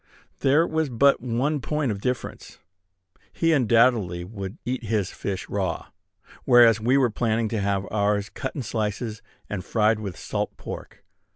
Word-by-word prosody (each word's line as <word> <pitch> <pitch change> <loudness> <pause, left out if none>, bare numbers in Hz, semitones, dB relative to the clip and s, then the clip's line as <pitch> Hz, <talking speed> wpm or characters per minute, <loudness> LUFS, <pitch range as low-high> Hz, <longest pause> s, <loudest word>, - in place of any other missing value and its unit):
There 145 +4 +4
was 160 -3 -1
but 135 +3 +3
one 130 +5 0
point 150 0 -1
of 100 -1 -5
difference. 125 +1 -4 0.7
He, 165 -1 +2
undoubtedly, 115 - +3
would 95 0 -7
eat 125 0 -3
his 105 -3 0
fish 95 -2 -4
raw; 95 -4 -3 0.5
whereas 115 -3 +6
we 125 +5 +3
were 130 -4 +3
planning 115 0 0
to 110 -2 -1
have 100 -1 0
ours 100 -1 +1
cut 130 - -5
in 140 - -3
slices, 110 0 -3 0.3
and 100 -3 -4
fried 110 +1 +2
with 100 -5 -6
salt - - -3
pork. - - -9
115 Hz, 155 wpm, -25 LUFS, 100-130 Hz, 0.7 s, whereas